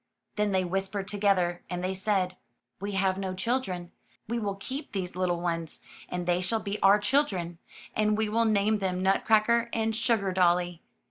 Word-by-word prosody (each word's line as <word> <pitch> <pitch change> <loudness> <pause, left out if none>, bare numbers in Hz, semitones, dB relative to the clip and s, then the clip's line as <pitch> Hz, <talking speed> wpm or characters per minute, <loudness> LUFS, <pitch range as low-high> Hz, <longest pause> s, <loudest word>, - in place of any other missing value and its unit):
Then 210 -1 +1
they 190 -1 +2
whispered 195 +2 -2
together, 195 -4 +1
and 180 0 -3
they 185 +1 0
said: 190 -2 0 0.5
''We 200 0 -3
have 190 0 +1
no 190 -1 -3
children. 190 -5 -2 0.4
We 235 +2 -1
will 200 -3 -2
keep 260 +9 -6
these 185 -3 -3
little 180 -2 0
ones, 165 -2 -2 0.3
and 180 -1 -3
they 175 0 +2
shall 220 +5 0
be 205 -1 -4
our 195 +1 +7
children, 205 - 0 0.4
and 210 0 +2
we 220 0 +1
will 230 +2 +2
name 215 0 +2
them 185 -1 -1
Nutcracker 220 +4 +3
and 225 0 0
Sugardolly.'' 185 -6 +2
195 Hz, 170 wpm, -28 LUFS, 180-215 Hz, 0.5 s, our